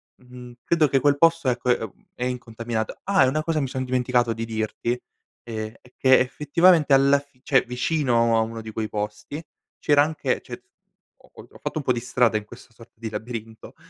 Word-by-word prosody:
mhmm, 125 -1 -13
credo 160 -3 +3
che 135 0 +2
quel 145 0 +3
posto 165 -4 +4
ecco 125 0 -1
è, 120 - +3
ehm, 110 -3 -9
è 125 - -4
incontaminato. 115 -2 -4
Ah 195 -5 +4
e - - +2
una 155 +4 0
cosa 160 -1 0
mi 135 - -1
son 130 0 -3
dimenticato 125 -2 +1
di 115 +1 -5
dirti, 115 +2 -2 0.4
ehm, 110 -1 -5
è 125 - -22
che 130 0 +5
effettivamente 150 +4 +3
alla 140 +1 +4
fi 140 -2 -22
cioè 135 -1 +3
vicino 125 -2 +1
a - - +3
uno 115 0 -4
di 110 - -8
quei 110 0 -3
posti, 105 +8 -5 0.4
c'era 145 -1 +4
anche 155 +1 -1
c'è - - -9 0.6
ho - - -21
ho - - -14
ho - - -16
fatto - - -4
un 150 - -2
po' 130 - +1
di 120 - -2
strada 120 -2 +2
in 105 - -6
questa 115 +2 -15
sorta 115 +2 -17
di 115 0 -6
labirinto, 110 +1 -7
125 Hz, 205 wpm, -24 LUFS, 115-140 Hz, 0.6 s, che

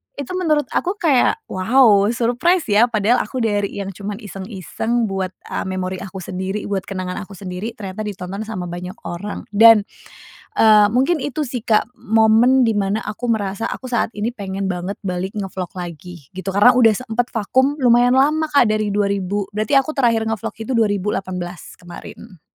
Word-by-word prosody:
itu 280 -2 -6
menurut 305 -5 +1
aku 365 +2 -1
kayak, 320 - +2
wow 205 +1 +4
surprise 245 +8 +1
ya 210 +3 +5
padahal 220 +2 +2
aku 255 - -4
dari 205 -3 0
yang 195 - -5
cuma 200 +2 -6
iseng-iseng 210 +2 -3
buat, 190 -1 -3
a - - -4
memori 185 0 -3
aku 190 0 -7
sendiri, 190 +3 -4
buat 195 -2 -2
kenangan 185 -2 -5
aku 200 - -13
sendiri, 190 +4 -6
ternyata 205 +1 -6
ditonton 195 +1 -5
sama 185 -5 -5
banyak 180 +1 -6 0.2
orang. 200 +4 -5
Dan, 225 +1 +7 0.8
eee, 210 -2 +7
mungkin 270 +5 +1
itu 295 0 -3
sih 245 -2 -5
Kak, 220 0 +2
momen 225 +4 +4
dimana 205 -1 0
aku 215 +4 -4
merasa 205 0 -2
aku 255 - -6
saat 235 -1 0
ini 220 +4 -1
pengen 195 -2 -4
banget 180 +2 -4
balik 180 +1 -3
nge-vlog 190 -3 -5
lagi, 175 -3 -9
gitu. 190 +1 -4
Karena, 205 +6 +6
udah 235 -3 +6
sempet 245 +1 -2
vakum 260 +7 +1
lumayan 245 -1 +4
lama 305 +4 +3
Kak, 280 -6 +5
dari 215 -1 0
2000 200 -1 -1
berarti 215 +6 +3
aku 270 +3 -2
terakhir 230 -4 +2
nge-vlog 220 -3 -3
itu 225 +3 -5
2018, 190 -4 -2
kemarin. 175 0 -12
210 Hz, 165 wpm, -20 LUFS, 190-240 Hz, 0.8 s, Dan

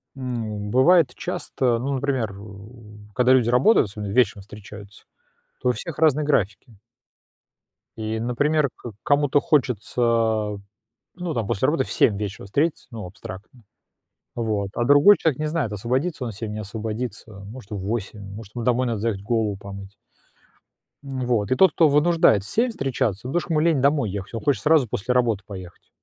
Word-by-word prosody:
м, 110 -6 -4
бывает 165 +6 +4
часто, 125 -3 -1
ну, 135 +4 -2
например, 130 -7 -1
у 105 +2 -13 0.2
когда 125 +4 +3
люди 125 -3 +3
работают, 125 - +4
особенно 105 0 -6
вечером 105 -3 +2
встречаются, 100 0 -12 0.6
то 125 - +1
у - - +5
всех 160 +2 -7
разные 150 -2 +3
графики. 110 -4 -1 1.2
И, 110 0 -3
например, 145 +5 +1
к 120 - -9
кому-то 145 0 +2
хочется, 115 -5 +1 0.6
ну 175 -2 -4
там 115 -6 -2
после 100 +7 0
работы 145 -3 +1
в - - -8
7 105 - +3
вечера 100 -1 -5
встретиться, 145 - -1
ну 110 -4 -7
абстрактно, 95 +5 -11 0.7
вот. 110 -4 -1
А 120 - 0
другой 145 +10 +7
человек 160 -5 0
не 155 - -1
знает, 150 -8 -1
освободится 130 - -2
он 120 - -3
в - - -10
7, 105 +1 -5
не 105 - -5
освободится. 110 +2 -5
Может, 100 +3 -11
в 105 - -4
8, 105 +1 -4
может, 110 -1 -11
ему 120 -2 -4
домой 125 +1 +2
надо 115 -3 -1
заехать, 105 -3 -2
голову 110 -2 0
помыть. 100 0 -10 1.1
Вот, 125 -6 -1
и - - +4
тот, 190 0 +5
кто 160 - +4
вынуждает 150 - +4
в 100 - -9
7 240 +3 +1
встречаться, 130 - -2
потому 175 +6 0
что 170 - -10
ему 155 - +2
лень 160 -3 +2
домой 140 -6 +2
ехать, 100 +2 -6
он 115 - -3
хочет 145 -2 +1
сразу 150 -5 +4
после 115 +5 -2
работы 115 -5 +1
поехать. 95 -4 -10
120 Hz, 170 wpm, -23 LUFS, 105-140 Hz, 1.2 s, другой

